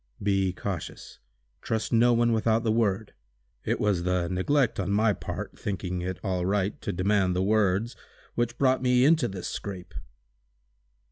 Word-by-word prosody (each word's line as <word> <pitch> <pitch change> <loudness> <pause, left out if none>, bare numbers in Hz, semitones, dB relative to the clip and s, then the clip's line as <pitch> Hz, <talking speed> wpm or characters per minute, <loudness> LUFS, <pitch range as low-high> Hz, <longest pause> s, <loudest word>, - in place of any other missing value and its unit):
"Be 95 -2 +2
cautious. 95 -1 -6 0.4
Trust 110 0 -2
no 120 +1 +5
one 120 0 +3
without 115 0 +2
the 110 - +1
word. 110 -2 0 0.5
It - - -1
was 100 -4 +1
the 90 -1 0
neglect 120 +9 +1
on 100 - -1
my 105 +1 +3
part, - - -6
thinking 90 -3 -3
it 90 0 -3
all 95 -3 -1
right, 100 +1 -1
to - - -3
demand 95 0 +1
the 90 - +1
'words,' 105 +2 +1 0.4
which 120 0 -1
brought 130 -1 +2
me 125 0 +3
into 155 -4 +4
this 95 -3 -6
scrape!" 95 -3 -6
100 Hz, 155 wpm, -27 LUFS, 95-115 Hz, 0.5 s, no